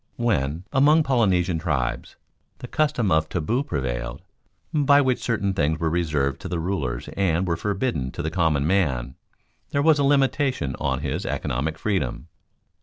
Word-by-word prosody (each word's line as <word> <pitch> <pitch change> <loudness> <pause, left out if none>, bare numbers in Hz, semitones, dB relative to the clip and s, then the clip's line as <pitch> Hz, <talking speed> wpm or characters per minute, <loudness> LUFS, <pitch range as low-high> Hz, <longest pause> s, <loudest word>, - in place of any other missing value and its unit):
When, 85 - 0
among 150 +4 +5
Polynesian 95 - +2
tribes, 75 -7 -2 0.4
the 125 - -8
custom 125 -9 0
of 80 0 +2
taboo 110 - -1
prevailed, 65 - -4 0.5
by 145 -2 +5
which 130 -3 +1
certain 100 -5 0
things 80 -3 0
were 80 -1 0
reserved 75 -5 0
to - - -6
the 90 -1 -2
rulers 80 -9 -3
and 95 -2 0
were 85 - +1
forbidden 95 - -2
to 85 - -4
the 80 - -2
common 80 -5 +1
man, 70 -9 0 0.6
there 140 - 0
was 155 -1 +5
a - - +3
limitation 135 - +1
on - - -1
his - - -2
economic 75 +6 -2
freedom. 95 - -2
90 Hz, 155 wpm, -24 LUFS, 75-120 Hz, 0.6 s, among